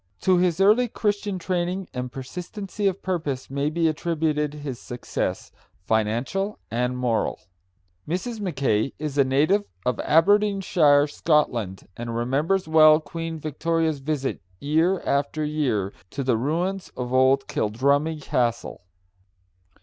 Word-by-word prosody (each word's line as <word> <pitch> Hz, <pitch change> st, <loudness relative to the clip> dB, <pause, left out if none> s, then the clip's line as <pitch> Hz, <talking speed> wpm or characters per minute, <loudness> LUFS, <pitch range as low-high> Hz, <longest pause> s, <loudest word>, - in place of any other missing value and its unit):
To 185 Hz, -1 st, +3 dB
his 180 Hz, -1 st, +1 dB
early 215 Hz, +6 st, +5 dB
Christian 205 Hz, -3 st, -1 dB
training 180 Hz, +1 st, -2 dB
and 125 Hz, 0 st, -4 dB
persistency 185 Hz, -, -4 dB
of 195 Hz, 0 st, -2 dB
purpose 155 Hz, -9 st, -3 dB
may 140 Hz, +2 st, 0 dB
be 165 Hz, +1 st, +1 dB
attributed 155 Hz, -2 st, -1 dB
his 145 Hz, -5 st, -6 dB
success, 120 Hz, 0 st, -4 dB, 0.3 s
financial 120 Hz, -, 0 dB
and 125 Hz, +2 st, -1 dB
moral. 120 Hz, -3 st, 0 dB, 0.7 s
Mrs. 190 Hz, +8 st, -3 dB
Mackay 135 Hz, -, 0 dB
is 150 Hz, -2 st, -3 dB
a -, -, +7 dB
native 150 Hz, +10 st, +2 dB, 0.2 s
of 125 Hz, -3 st, 0 dB
Aberdeenshire, 180 Hz, -4 st, +4 dB
Scotland, 125 Hz, -, 0 dB
and 115 Hz, 0 st, -5 dB
remembers 145 Hz, +10 st, 0 dB
well 155 Hz, -1 st, +7 dB
Queen 165 Hz, 0 st, -5 dB
Victoria's 160 Hz, 0 st, -1 dB
visit 140 Hz, -1 st, -2 dB, 0.2 s
year 160 Hz, +6 st, +1 dB
after 145 Hz, +2 st, -1 dB
year 130 Hz, -11 st, -1 dB, 0.2 s
to 140 Hz, -, -4 dB
the 125 Hz, -2 st, +2 dB
ruins 175 Hz, +10 st, -2 dB
of 125 Hz, 0 st, -4 dB
old 130 Hz, +1 st, +4 dB
Kildrummie 140 Hz, +8 st, 0 dB
Castle. 120 Hz, -1 st, -1 dB
150 Hz, 125 wpm, -24 LUFS, 130-180 Hz, 0.7 s, a